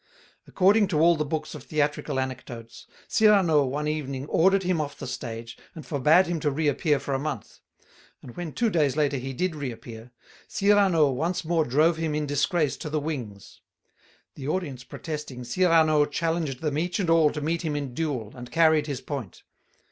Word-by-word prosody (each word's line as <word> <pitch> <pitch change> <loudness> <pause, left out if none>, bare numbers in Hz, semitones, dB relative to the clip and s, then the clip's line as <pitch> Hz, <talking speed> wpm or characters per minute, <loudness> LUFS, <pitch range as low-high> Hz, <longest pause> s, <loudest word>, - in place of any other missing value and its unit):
According 200 +2 +4
to 165 -5 0
all 170 +2 +5
the 150 - -1
books 155 +1 -4
of 150 - -8
theatrical 145 -1 -1
anecdotes, 120 -3 -7 0.2
Cyrano 190 -9 +4
one 145 +3 -2
evening 140 -3 -3
ordered 190 +5 +3
him 180 -3 +1
off 145 -1 -5
the - - -7
stage, 115 -1 -6 0.2
and 160 - -9
forbade 155 +5 +4
him 170 -1 -2
to 150 - 0
reappear 150 +1 +1
for 140 - -4
a 135 - 0
month; 155 +2 -5 0.6
and 120 - -11
when 175 -3 -5
two 230 +4 0
days 150 -5 +1
later 145 -2 +1
he 130 +1 -5
did 175 +5 -2
reappear, 120 -4 -7 0.4
Cyrano 195 -7 +3
once 165 +7 -2
more 165 -1 +1
drove 155 +6 +3
him 160 -2 -2
in 150 0 -1
disgrace 145 +1 0
to 150 - -6
the 155 0 -1
wings. 125 -10 -6 0.7
The 135 -2 -7
audience 150 -7 -3
protesting, 150 -6 -7
Cyrano 155 +1 +3
challenged 160 -3 -2
them 150 -2 -1
each 175 +3 -2
and 190 - 0
all 165 -2 +5
to 150 - -4
meet 160 +3 -1
him 155 -3 -2
in 140 -4 -4
duel, 130 -8 -3
and 125 -1 -10
carried 160 -2 +4
his 140 -3 -4
point. 135 - -7
150 Hz, 180 wpm, -26 LUFS, 135-165 Hz, 0.7 s, all